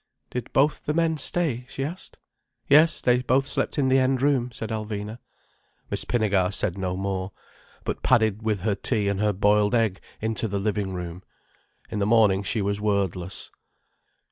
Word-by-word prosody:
"Did 125 -2 -5
both 145 +2 +2
the 150 - -1
men 165 -1 +2
stay?" 130 -4 -1
she 135 - -4
asked. 165 +6 -7 0.5
"Yes, 155 +3 +5
they 125 0 +3
both 130 +2 +1
slept 140 - -1
in 140 -2 +2
the 130 +1 +4
end 130 0 +2
room," 130 -4 +2
said 110 -2 -5
Alvina. 110 0 -4 0.7
Miss - - -1
Pinnegar 100 -6 +1
said 90 -3 -1
no 95 -2 -3
more, 95 -1 -3 0.5
but - - -3
padded 110 -2 +2
with 110 -4 -1
her 105 +1 +1
tea 105 0 0
and 100 -1 0
her 105 0 +2
boiled 105 +3 +3
egg 110 -5 +1 0.2
into 110 +1 -1
the 100 -1 -2
living 100 -1 -1
room. 90 0 -6 0.7
In 105 - -2
the 100 - +1
morning 105 -4 +4
she 100 +2 -1
was 100 +1 -1
wordless. 95 -3 -1
110 Hz, 170 wpm, -25 LUFS, 100-125 Hz, 0.7 s, Yes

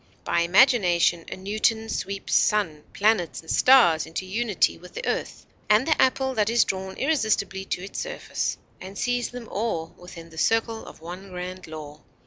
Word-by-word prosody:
By - - +1
imagination 175 -3 +4
a - - -5
Newton 215 +3 0
sweeps 200 -2 -4
sun, 165 -8 +2
planets, 205 -5 +1
and 160 - -7
stars 235 -12 +5
into 165 +3 -5
unity 210 +1 +1
with 180 +1 -15
the - - -5
earth - - -3 0.2
and 215 +4 +5
the 315 - +2
apple 265 0 +2
that 215 -3 +1
is 235 +1 +4
drawn 190 0 -4
irresistibly 220 -9 0
to 180 - -3
its 195 - -6
surface, - - -3 0.2
and 190 +2 -9
sees 245 0 -1
them 245 -2 -9
all 195 -8 -3
within 170 -2 -11
the 160 - -8
circle 225 +2 0
of - - -13
one 180 +4 -9
grand 180 0 -7
law. 155 -1 -9
195 Hz, 170 wpm, -25 LUFS, 175-225 Hz, 0.2 s, stars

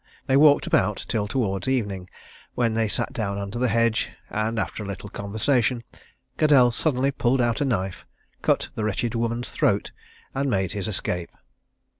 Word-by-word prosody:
They 135 - +2
walked 145 0 +6
about 100 +2 +1
till 105 -3 -1
towards 100 -3 -1
evening, 100 -8 -1 0.5
when 115 -2 +1
they 110 0 +1
sat - - -2
down 100 -3 -2
under 100 +3 -4
the 125 - +2
hedge, 115 0 +2 0.2
and 110 +2 -1
after 110 - -2
a 105 - -5
little 100 +1 -6
conversation, 115 +4 0 0.6
Caddell 140 -6 +6
suddenly 135 +1 +1
pulled 130 -1 +1
out 120 +3 +1
a - - +2
knife, 95 -7 -2 0.3
cut - - +1
the 110 - -3
wretched 110 +3 -1
woman's 115 +1 -1
throat, - - +1 0.4
and 135 +1 0
made 95 -5 0
his 100 -1 -3
escape. 90 -4 -2
115 Hz, 165 wpm, -25 LUFS, 100-125 Hz, 0.6 s, walked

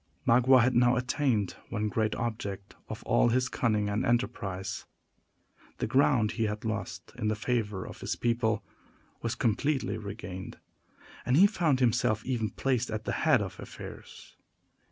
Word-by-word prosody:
Magua 125 +1 +6
had 125 +1 +2
now 120 +1 +4
attained 125 - 0
one 105 -2 -1
great 110 0 0
object 105 -4 -4
of - - -6
all - - +3
his 130 +2 +2
cunning 105 -4 +1
and 105 +4 0
enterprise. 100 -6 -1 0.9
The - - -1
ground 125 -3 +3
he 115 -1 -1
had 105 +1 -3
lost 95 -5 -4
in 110 - -1
the 110 - +1
favor 105 -3 -1
of - - -10
his - - -2
people 115 -2 0 0.6
was 115 +1 -2
completely 125 +1 0
regained, 100 -3 -7 0.7
and 125 +3 +2
he 190 - +8
found 165 -10 +2
himself 115 -3 +2
even 115 -5 -1
placed 125 +3 -1
at 110 0 -3
the - - -1
head - - +3
of - - -7
affairs. - - -10
115 Hz, 155 wpm, -29 LUFS, 105-125 Hz, 0.9 s, he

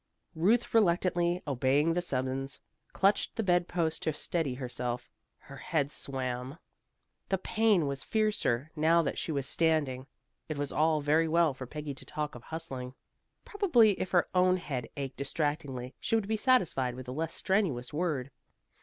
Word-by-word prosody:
Ruth 210 +9 +2
reluctantly 175 -3 +2
obeying 140 +3 +2
the 175 - 0
summons, 135 -3 -3 0.3
clutched 200 +1 +2
the 225 - -1
bed 175 -2 +2
post 165 -2 -1
to 160 - +1
steady 150 -3 -2
herself. 125 -1 -4 0.3
Her - - -13
head 145 -3 -1
swam. 130 -2 -4 0.7
The 190 - +2
pain 210 -3 +2
was 140 -1 -2
fiercer, 165 - 0
now 165 +2 +4
that 140 - -2
she - - -3
was 140 -3 -2
standing. 145 -5 +1 0.4
It 155 - -3
was 145 -1 -2
all 155 0 +2
very 155 +3 +3
well 165 -2 +3
for 130 -1 -8
Peggy 150 +1 -5
to 135 - -12
talk 150 -1 -4
of 120 - -9
hustling. 130 -4 -6 0.5
Probably 330 - +4
if 185 - -2
her 175 -2 +3
own 185 0 +4
head 135 -9 -4
ached 135 -2 -4
distractingly 140 -3 -2
she - - 0
would 220 -3 0
be 220 - +1
satisfied 185 - +2
with 130 0 -8
a - - -4
less 160 +4 -3
strenuous 175 - 0
word. 150 -5 -1
155 Hz, 165 wpm, -30 LUFS, 135-175 Hz, 0.7 s, now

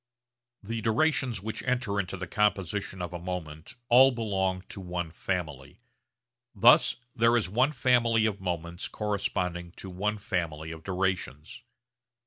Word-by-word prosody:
The 115 +2 -4
durations 120 - +1
which 110 0 -4
enter 125 -5 -1
into 95 -1 -3
the 95 - -4
composition 100 -1 -1
of 90 0 -5
a 85 - -4
moment 85 -3 -6
all 130 +3 +8
belong 95 -6 -1
to 100 - -7
one 90 -2 -4
family. 80 -7 -4 0.8
Thus - - +6 0.2
there 115 0 +4
is 110 - 0
one 125 +9 +2
family 120 -4 +3
of 100 -3 -1
moments 85 -1 -3
corresponding 90 -4 -2
to 95 - -8
one 105 +4 -1
family 80 -5 -3
of 80 -1 -8
durations. 95 - -3
95 Hz, 135 wpm, -28 LUFS, 90-110 Hz, 0.8 s, all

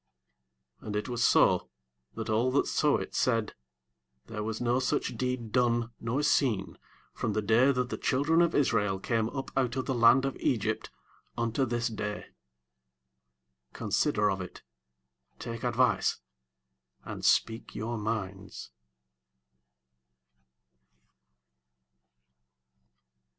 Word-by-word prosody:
30 - - -13
And 105 - -3
it 105 - -2
was 120 -1 -1
so, - - +4 0.5
that - - -5
all 110 +4 +2
that 140 - +3
saw 150 -1 +2
it - - -6
said, 115 -4 +1 0.7
There 110 -2 -6
was 110 +1 -3
no 120 +1 +1
such 130 - -1
deed 125 -3 -3
done 120 -1 +1
nor 125 +6 -1
seen 125 -9 +1 0.3
from 105 - -2
the 110 - 0
day 115 +6 +4
that 125 -2 -1
the - - -4
children 150 +6 +2
of 170 -1 +2
Israel 105 -8 +1
came 115 +2 0
up 135 0 -5
out 130 -2 0
of 130 - -2
the 135 - -1
land 120 +2 +5
of 135 - -2
Egypt 115 -6 -1 0.5
unto 115 +3 0
this 120 0 -1
day: 105 -2 -5 1.4
consider 105 -1 +1
of 95 0 -3
it, 90 - -9 0.7
take 115 -1 -6
advice, 125 +1 +2 0.9
and - - -7
speak 115 0 +1
your 115 +2 -3
minds. 105 -3 -5
115 Hz, 120 wpm, -29 LUFS, 110-130 Hz, 1.4 s, land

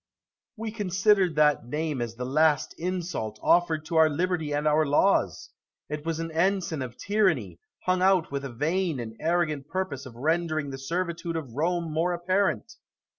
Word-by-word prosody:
Brutus. 220 0 -4
We 225 - -15
considered 195 -2 +2
that 150 -5 +3
name 150 0 -2
as 115 -1 -4
the 125 +1 -4
last 150 +2 +2
insult 170 -11 -3
offered 165 -3 +3
to 160 +1 -2
our 160 -1 +6
liberty 165 0 -1
and 145 +1 0
our 150 +1 +4
laws; 145 - +2 0.4
it 150 0 -4
was 165 -1 -1
an 165 0 -4
ensign 175 -2 0
of 125 -2 -6
tyranny, 165 - 0 0.2
hung 185 0 +1
out 185 -4 +3
with 140 0 -3
a 135 - -5
vain 160 +4 -1
and 110 -2 -6
arrogant 155 -4 0
purpose 145 -8 -3
of 120 - -12
rendering 155 +1 0
the 135 - -6
servitude 170 +3 -3
of 145 -8 -5
Rome 165 +3 -1
more 170 +3 +1
apparent. 190 +6 0
160 Hz, 175 wpm, -27 LUFS, 140-180 Hz, 0.4 s, our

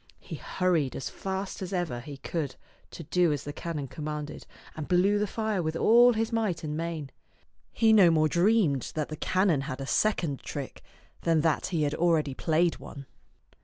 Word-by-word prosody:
He - - -8
hurried 170 -7 0
as 135 - -5
fast 190 0 -4
as 185 0 -5
ever 175 -10 -2
he 140 +3 -9
could 145 -1 -4 0.3
to 165 - -9
do 170 +2 +2
as 145 - -2
the 145 - -6
canon 155 -3 -4
commanded, 150 +1 -6 0.3
and 155 -2 -5
blew 195 +3 +3
the 210 - 0
fire 215 -2 -1
with 160 -1 -2
all 240 +7 +6
his 225 +1 -1
might 210 -8 -1
and 150 -1 -3
main. 160 -4 -4 0.6
He 220 -1 +4
no 195 -5 +7
more 155 -1 +3
dreamed 170 - +2
that 155 -2 -2
the 155 - -5
canon 185 -3 +1
had 135 -1 -5
a 135 - -4
second 165 -5 0
trick 140 -3 -6 0.4
than 165 -2 +2
that 160 -1 +1
he 170 -5 0
had 145 0 0
already 160 -4 +1
played 165 +4 +1
one. 140 -2 -10
165 Hz, 185 wpm, -28 LUFS, 150-190 Hz, 0.6 s, no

